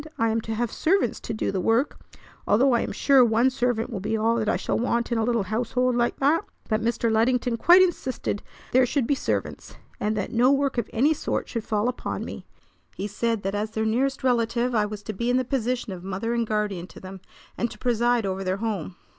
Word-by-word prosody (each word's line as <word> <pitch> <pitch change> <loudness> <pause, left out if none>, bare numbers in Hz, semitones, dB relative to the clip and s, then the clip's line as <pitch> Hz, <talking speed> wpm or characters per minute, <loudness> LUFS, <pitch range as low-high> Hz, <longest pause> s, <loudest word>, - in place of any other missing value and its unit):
I 230 0 +2
am 225 +1 0
to 225 0 -4
have 235 0 -1
servants 385 +5 +1
to - - -6
do 215 - -1
the 190 -2 -1
work, 230 +9 +1 0.5
although 255 +5 +4
I'm 235 - 0
sure 275 -3 +5
one 235 +3 +3
servant 245 -2 -1
will 210 - -3
be 220 +3 -1
all 225 +2 +2
that 215 -2 0
I - - +2
shall - - -1
want 235 0 0
in 235 - +1
a - - +1
little 235 -2 +1
household 245 +4 0
like 240 0 +1
that. 300 +7 +2 0.2
But 215 -1 0
Mr. 230 0 0
Luddington 240 +2 +2
quite 355 +8 +7
insisted 260 - -2 0.3
there 255 0 +4
should 270 -1 0
be 285 - +1
servants, 275 - -3 0.2
and 210 +1 -1
that 200 - -3
no 245 +3 +4
work 275 -2 +1
of - - -3
any 280 +8 +3
sort - - -3
should 230 -3 -4
fall 215 +1 0
upon 250 - -3
me. - - -8 0.5
He 195 - -4
said 220 +1 -1
that 195 +1 -2
as 210 +1 -2
their 220 0 -2
nearest 260 +6 0
relative 240 0 +1
I 210 -2 +2
was 210 -1 -7
to 215 - -5
be 235 +5 -2
in 250 - +3
the 255 - 0
position 245 -4 -2
of 180 -1 -9
mother 195 +5 -3
and 235 -1 0
guardian 210 -5 -2
to - - -13
them, 190 0 -10 0.3
and 235 - -1
to 215 - -11
preside 240 0 +1
over 190 0 -2
their 185 0 -1
home." 200 -5 -3
230 Hz, 230 wpm, -25 LUFS, 215-250 Hz, 0.5 s, quite